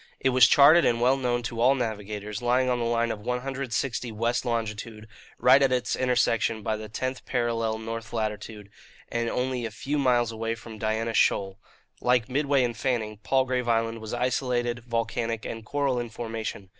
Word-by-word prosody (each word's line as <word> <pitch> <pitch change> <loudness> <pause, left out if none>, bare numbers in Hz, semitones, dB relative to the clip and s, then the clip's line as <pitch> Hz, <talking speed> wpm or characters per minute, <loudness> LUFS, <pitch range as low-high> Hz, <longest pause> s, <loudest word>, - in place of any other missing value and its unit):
It 135 - +2
was 130 0 +6
charted 155 +4 +7
and 115 -1 +2
well 125 +2 +4
known 120 -2 -1
to 115 0 -4
all 130 +3 +5
navigators, 105 -3 -4
lying 125 +1 +2
on 125 - 0
the 120 - -1
line 115 0 +1
of 105 - -5
160 125 0 -3
west 115 +2 -1
longitude, 110 -2 -3 0.3
right 130 +2 +6
at 135 -2 +3
its 125 -1 0
intersection 115 -3 +1
by 110 - 0
the 110 0 -8
tenth 130 +4 -4
parallel 115 -2 0
north 115 0 -6
latitude, 105 -2 -4 0.4
and 115 0 -1
only 125 0 -2
a 115 - -2
few 140 +7 -3
miles 120 -3 +2
away 115 0 -3
from 110 -1 -11
Diana 110 +1 -1
Shoal. 95 -2 +1 0.4
Like 125 -3 +2
Midway 140 0 +2
and 120 -1 -1
Fanning, 110 -3 -2
Palgrave 130 +2 0
Island 115 0 0
was 110 - -7
isolated, 120 -1 0
volcanic 115 -1 -2
and 115 -1 -6
coral 140 +1 0
in 120 -1 -4
formation. 110 -4 -5
115 Hz, 175 wpm, -26 LUFS, 110-125 Hz, 0.4 s, charted